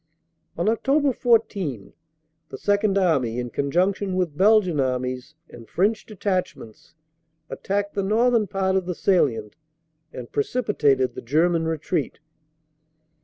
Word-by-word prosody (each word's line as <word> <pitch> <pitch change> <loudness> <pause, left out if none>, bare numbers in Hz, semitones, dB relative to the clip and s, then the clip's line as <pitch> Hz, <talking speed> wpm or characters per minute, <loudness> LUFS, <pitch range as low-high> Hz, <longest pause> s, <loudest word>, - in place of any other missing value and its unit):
On 170 - -1
Oct. 270 +5 +1
14 200 - 0 0.6
the - - -8
Second 205 -1 +1
Army, 135 -11 +1
in 120 -1 -4
conjunction 185 +6 0
with 180 -5 -1
Belgian 190 -4 +3
Armies 130 +2 -2
and 115 -1 -14
French 210 +5 0
Detachments, 185 - -4 0.6
attacked 200 +1 -3
the 200 - -1
northern 225 +2 +2
part 190 0 -1
of 190 -2 0
tbe 180 - -3
salient 130 - +1 0.6
and 125 -2 -9
precipitated 145 - +1
the - - -7
German 165 +6 +1
retreat." 160 0 -2
185 Hz, 120 wpm, -23 LUFS, 140-205 Hz, 0.6 s, Belgian